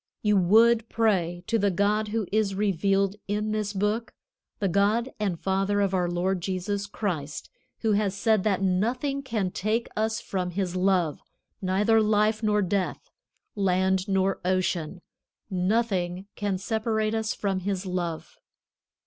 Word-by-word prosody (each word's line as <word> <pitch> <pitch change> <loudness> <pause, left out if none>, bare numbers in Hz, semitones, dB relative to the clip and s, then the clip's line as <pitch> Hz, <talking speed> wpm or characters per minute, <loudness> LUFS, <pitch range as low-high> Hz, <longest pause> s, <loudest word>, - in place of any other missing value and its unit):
You 210 -1 +3
would 225 +5 +4
pray 175 -6 +1
to 230 +3 +1
the 200 0 +3
God 205 +3 +1
who 215 0 -1
is 210 -2 +1
revealed 195 0 +1
in 210 +1 -1
this 215 -1 -1
Book, 210 +3 -1 0.4
the 200 - 0
God 210 +7 +2
and 195 -6 -1
Father 195 +1 0
of 200 -1 +1
our 180 -2 +1
Lord 180 +1 0
Jesus 195 +3 -2
Christ, 165 -8 -4 0.3
who 225 - +1
has 200 -2 +1
said 215 -1 +2
that 195 -3 +1
nothing 245 +9 0
can 220 -8 -2
take 215 +6 -1
us 220 +1 0
from 185 -2 -3
His 185 0 -2
love, 180 -4 +1 0.4
neither 205 +4 +3
life 215 +1 +2
nor 210 -2 +2
death, 190 +1 -2 0.4
land 190 -1 +1
nor 195 0 +1
ocean, 180 -1 -1 0.5
nothing 185 -1 0
can 205 -2 -2
separate 220 +1 -1
us 220 -1 -1
from 195 -2 -1
His 190 0 -3
love. 175 -3 -4
200 Hz, 145 wpm, -26 LUFS, 185-215 Hz, 0.5 s, would